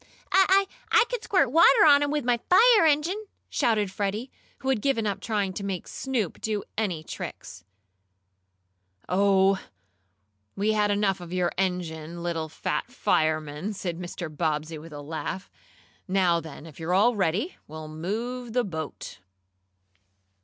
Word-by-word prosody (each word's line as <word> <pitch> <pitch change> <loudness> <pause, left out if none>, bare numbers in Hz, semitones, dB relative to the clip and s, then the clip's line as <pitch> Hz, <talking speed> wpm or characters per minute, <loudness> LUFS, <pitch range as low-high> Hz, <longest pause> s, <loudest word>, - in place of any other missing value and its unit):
"I 385 +1 +5 0.3
I - - +6
could - - -2
squirt 280 -11 +2
water 325 -1 +6
on 285 -2 +7
'em 290 - +1
with 295 -3 -1
my 245 -1 +2
fire 435 -1 +7
engine!" 340 +9 +1 0.2
shouted 210 -4 +1
Freddie, 210 +6 -3 0.3
who 265 - -2
had 255 -6 +1
given 265 -4 +1
up 200 -2 -1
trying 200 -2 -1
to 200 - -5
make 195 -3 -4
Snoop 245 -10 -3
do 215 -2 -2
any 185 -8 -2
tricks. 90 - -8 1.4
"Oh, 195 0 +3 1.0
we 205 +2 +1
had 210 -1 +2
enough 200 -2 +1
of 175 -1 -9
your 180 -1 0
engine, 170 -3 -3
little 165 -2 -2
fat - - -3
fireman," 155 +4 0
said 175 -4 -4
Mr. 175 -1 -5
Bobbsey 155 0 -2
with 165 +2 -12
a 145 -1 -8
laugh. 160 +5 -5 0.6
"Now 185 -3 +3
then, 160 -2 -10
if 160 -2 -13
you're 165 +3 0
all 225 +5 +4
ready, 195 - -1
we'll 155 0 -8
move 225 +10 -4
the 250 0 +2
boat." 160 - -6
195 Hz, 145 wpm, -26 LUFS, 165-240 Hz, 1.4 s, on